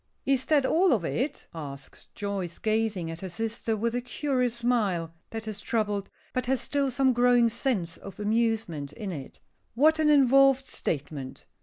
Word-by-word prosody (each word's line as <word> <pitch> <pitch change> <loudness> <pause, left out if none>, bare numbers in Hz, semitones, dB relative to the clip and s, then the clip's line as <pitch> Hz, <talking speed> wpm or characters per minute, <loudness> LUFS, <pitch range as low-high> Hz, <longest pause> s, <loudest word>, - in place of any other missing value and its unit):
"Is 265 -1 +2
that 290 -3 +3
all 345 +3 +4
of 200 -8 0
it?" 270 - -2
asks 140 -4 -9
Joyce, 195 -4 -3
gazing 215 -6 0
at 165 - -7
her 190 - -5
sister 225 +3 -2
with 230 +2 -1
a 245 - -1
curious 250 -1 -1
smile, 210 -9 0 0.2
that 225 0 -6
is 210 -1 -5
troubled, 210 -3 -1 0.2
but 255 -1 -1
has 265 0 +2
still 280 -1 0
some 260 +1 +2
growing 245 -1 +4
sense 220 -8 -2
of 195 - -11
amusement 210 -9 0
in 195 +4 -5
it. 140 -6 -8 0.3
"What 310 +5 +4
an 310 -1 +4
involved 275 -1 +5
statement! 145 - -4
225 Hz, 165 wpm, -27 LUFS, 190-260 Hz, 0.3 s, involved